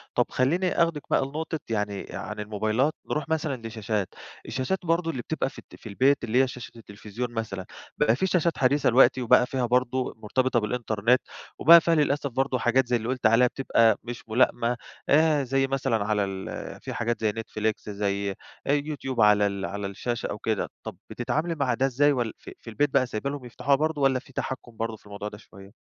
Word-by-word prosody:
طَب - - +3
خلّيني 175 +8 +1
أخدِك 165 -3 -1
بقى - - +2
لنقطة 155 +3 -4
يعني 105 -3 -2
عن 105 0 -6
الموبايلات 110 +7 0 0.2
نروح 150 0 -2
مثلًا 145 -7 -2
لشاشات. 105 -3 -2 0.4
الشاشات 135 +10 -2
برضه 165 0 +1
اللي 130 -5 -4
بتبقى 160 -2 -2
في - - -12
الت - - -15
في 115 - -11
البيت 135 +7 +2
اللي 120 +2 +3
هي - - +1
شاشة 125 -1 -8
التليفزيون 110 +2 -6
مثلًا، 105 -5 -4 0.3
بقى 110 - +3
في 190 - 0
شاشات 170 -3 +1
حديثة 135 +2 +3
دلوقتي 130 +1 +5
وبقى 125 +1 +5
فيها 130 -1 -1
برضه 125 +1 0
مرتبطة 125 +3 +1
بالإنترنت، 115 +1 +1 0.4
وبقى 170 +2 +9
فيها 165 0 +2
للأسف 145 -2 +1
برضه 130 +1 0
حاجات 120 +2 +2
زي، 120 - +1
اللي 115 -1 -2
قُلتِ 130 -2 -3
عليها 115 +3 +6
بتبقى 115 -4 +2
مش 120 -1 -8
مُلائِمة، 120 +1 +2 0.3
آآ 155 -1 +4
زي 135 +1 +1
مثلًا 115 -6 0
على 105 -1 +1
ال 95 -1 -6
في - - -6
حاجات 120 0 -1
زي 110 -1 +2
Netflix 110 -1 -3
زي 100 -1 -1 0.4
YouTube 145 -3 -1
على 105 -1 +5
ال 100 -1 -3
على 100 0 -4
الشاشة 120 +4 -3
أو - - -4
كده. 110 -1 -1
طَب - - -7
بتتعاملي 155 +7 -2
مع 135 -5 0
ده 130 +3 +1
إزاي؟ 140 +3 +3
ول 120 -5 -1
ف - - -12
في - - -10
البيت 145 +6 +1
بقى 135 -1 +3
سايبة 120 +2 -3
لهُم 140 -3 -6
يفتحوها 125 +3 +1
برضه 155 0 -1
والّا 130 -1 +3
في 135 +1 -19
تحكُّم 125 -3 -5
برضه 115 0 -3
في - - -27
الموضوع 105 0 -6
ده 105 - -11
شوية؟ 100 -1 -15
125 Hz, 195 wpm, -26 LUFS, 110-140 Hz, 0.4 s, وبقى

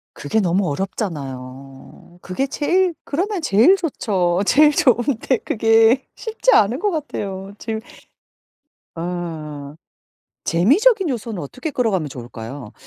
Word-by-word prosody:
그게 185 +10 -1
너무 185 0 +1
어렵잖아요. 135 - -6
그게 185 +10 -2
제일 350 +6 +1
그러면 375 +6 -2
제일 280 - +5
좋죠. 195 - 0
제일 300 +2 +6
좋은데 250 -1 +2
그게 225 +3 +3
쉽지 455 +2 0
않은 220 +6 +4
것 415 - 0
같아요. 200 - -5
지금 220 -1 -4 1.1
어. 160 -4 -5 0.7
재미적인 330 - +3
요소는 225 -6 -4
어떻게 255 - -6
끌어가면 215 - 0
좋을까요? 120 -1 -9
210 Hz, 260 characters per minute, -20 LUFS, -, 1.1 s, 제일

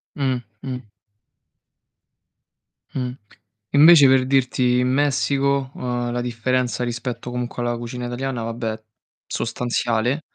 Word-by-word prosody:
Mh-mh. 125 -2 -3 2.1
Mh, 125 -2 -2 0.6
invece 150 -1 +8
per 130 -1 +4
dirti 125 -2 +2
in 125 - +2
Messico, 140 0 +1
uhm, 120 -1 -3
la 120 - -1
differenza 125 +1 -1
rispetto 120 0 -4
comunque 125 0 -4
alla 120 0 0
cucina 120 +1 -5
italiana 120 -1 -3
vabbè, 115 -1 -4 0.5
sostanziale. 120 +2 -1
125 Hz, 100 wpm, -22 LUFS, 120-135 Hz, 2.1 s, invece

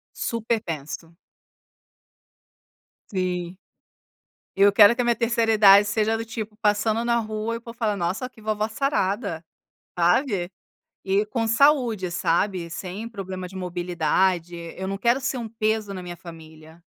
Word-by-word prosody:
Super 230 -1 -1
penso. 160 0 -6 2.0
Sim, 180 -2 -2 1.0
eu 200 0 +5
quero 205 +2 +8
que 250 - 0
a - - -1
minha 235 -1 +3
terceira 230 -1 +1
idade 205 -1 +7
seja 220 +1 +1
do 225 - -5
tipo 220 -2 -6
passando 215 +2 +1
na 235 0 +2
rua 215 +1 -3
e - - -3
o - - -12
povo 230 0 -11
falar, 215 -3 0
"Nossa, 190 +8 -2
que 225 -3 -19
vovó 215 0 -1
sarada", 210 - -1 0.6
sabe? 180 +1 +2 0.5
E 195 +2 +2
com 225 0 -1
saúde, 230 - +3
sabe, 175 +1 0
sem 195 +5 -6
problemas 190 -4 -6
de 190 - -10
mobilidade, 175 0 0 0.2
eu 190 - -4
não 195 +1 -3
quero 240 +5 +2
ser 255 0 -2
um 230 -2 -5
peso 215 -2 -1
na 185 - -6
minha 175 -1 -7
família. 160 -1 -13
205 Hz, 150 wpm, -24 LUFS, 180-225 Hz, 2.0 s, quero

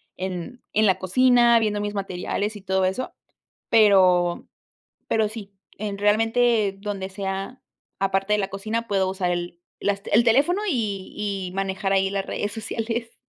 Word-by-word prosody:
en 185 +6 -5
en 215 +1 +3
la 190 -3 +3
cocina 240 +4 +4
viendo 210 -2 0
mis 205 0 -3
materiales 200 +2 -3
y 205 - -9
todo 190 0 +1
eso, 190 +8 -2 0.6
pero 185 -5 +4 0.6
pero 220 -1 +1
sí, 210 -2 -9 0.3
en 205 -1 -4
realmente 225 0 +2
donde 200 -2 -4
sea, 195 +5 -5 0.4
aparte 195 +1 +1
de 210 - +2
la 195 - 0
cocina, 220 +4 -3
puedo 195 -2 +1
usar 190 -1 -1
el 175 0 -4 0.2
las 200 -1 -1
t - - -8
el 235 - +6
teléfono 280 - +3
y 210 - -2
y 195 -3 -3
manejar 195 0 -2
ahí 195 0 +2
las 195 -1 -2
redes 205 - -3
sociales. 230 +1 -4
200 Hz, 160 wpm, -24 LUFS, 190-225 Hz, 0.6 s, el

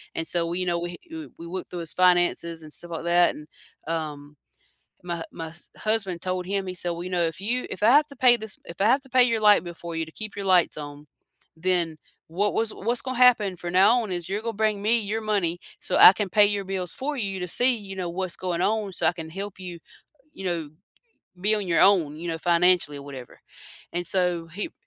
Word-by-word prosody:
And 165 - -2
so, 170 -1 0
we 175 +2 -3
you 180 - -1
know, 170 -1 0
we 175 0 -5 0.2
w 320 -1 -7
we 170 - -9
looked 185 +2 -5
through 175 -1 -5
his 165 - -8
finances 175 -2 +2
and 150 - -10
stuff 175 0 -6
like 165 - -5
that. 175 0 +3
And, 150 - -11 0.4
um 150 -3 -5 0.7
my 170 -1 -3
my 165 -1 -6
h - - -14 0.2
husband 205 -5 -1
told 185 -1 -2
him, 195 0 -2
he 180 - -4
said, 175 -1 -3
"Well, 170 +1 -5
you 185 - -6
know, 175 -2 +1
if 165 +1 -4
you 245 +5 -1
if 190 - -7
I 220 - +6
have 295 +2 +5
to 280 - -12
pay 245 -1 +5
this 220 -2 -8
if 170 - -10
I - - +3
have 260 +5 +4
to 265 - -15
pay 255 0 +5
your 230 -3 +1
light 210 -1 +6
bill 175 -1 -7
for 170 0 -7
you 160 - -1
to 160 - -14
keep 215 -2 -5
your 200 - -4
lights 180 -4 +3
on, 145 0 -9 0.5
then, 170 -2 0 0.3
what 200 +6 0
was 225 -1 -1
what's 235 +4 -2
gonna 255 -2 -4
happen 220 -7 +4
from 175 0 -6
now 210 +6 +5
on 215 - -5
is 175 0 -4
you're 205 +2 -1
gonna 230 0 -3
bring 210 -2 +1
me 230 +3 +3
your 210 +2 -2
money, 190 -5 -1 0.2
so - - 0
I 185 - +10
can 205 -2 -3
pay 210 +2 +5
your 200 -1 -1
bills 185 -2 -4
for 290 +2 -4
you 195 -5 -2
to 180 - -3
see, 250 +5 +3
you 195 -2 -9
know, 180 -2 -3
what's 185 0 -3
going 180 -2 -2
on, 210 -1 0
so - - -2
I - - +4
can 160 -2 -8
help 195 +2 -7
you, 175 -2 -8 0.5
you 195 - -8
know, 170 -4 -2 0.7
b - - -18
be - - +5
on 205 -3 -1
your 165 -2 +3
own, 175 -7 +4
you 170 +2 -6
know, 165 - -2
financially 175 -3 +2
or 140 - -9
whatever." 130 -3 -10 0.5
And, 175 -1 -2
so, 180 -3 0
he 185 +6 -5
180 Hz, 250 wpm, -25 LUFS, 170-210 Hz, 0.7 s, I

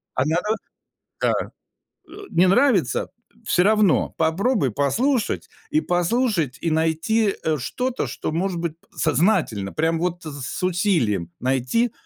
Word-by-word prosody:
А 130 - +1
на 160 +3 +1
на. 210 +5 0 0.7
Да. - - +3 0.8
Э, 410 +1 -10
не 180 +2 +4
нравится- 195 - +2 0.3
всё 180 -4 +2
равно 210 -3 +3
попробуй 165 - +1
послушать, 225 - 0 0.2
и 310 +1 +3
послушать, 175 - 0
и 165 - 0
найти, 165 +7 +1
э, 155 -1 +1
что-то, 250 - -2
что - - -4
может 175 +1 -1
быть 170 -2 -3 0.2
сознательно, 155 - +1
прямо 160 +1 +1
вот 175 0 -2
с 145 +3 -6
усилием 170 - +1
найти 130 - +1
175 Hz, 130 wpm, -23 LUFS, 155-215 Hz, 0.8 s, не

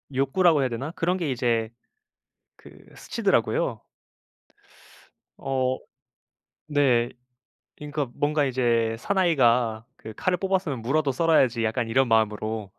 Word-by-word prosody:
욕구라고 150 +4 +3
해야 130 - 0
되나? 130 +6 -5
그런 180 +1 -1
게 165 -6 -2
이제 120 -3 0 0.9
그 - - -16 0.2
스치더라고요. - - -1 1.6
어 130 -1 -1 0.9
네. 130 -5 +2 0.7
그니까 150 -1 -4
뭔가 150 0 0
이제 120 -3 +1
'사나이가 125 - +2
그 110 - -10
칼을 185 -1 0
뽑았으면 185 - -1
무라도 140 +4 0
썰어야지.' 130 -6 +2
약간 115 +1 -1
이런 130 +3 +2
마음으로. 110 -2 0
130 Hz, 260 characters per minute, -25 LUFS, 115-150 Hz, 1.6 s, 욕구라고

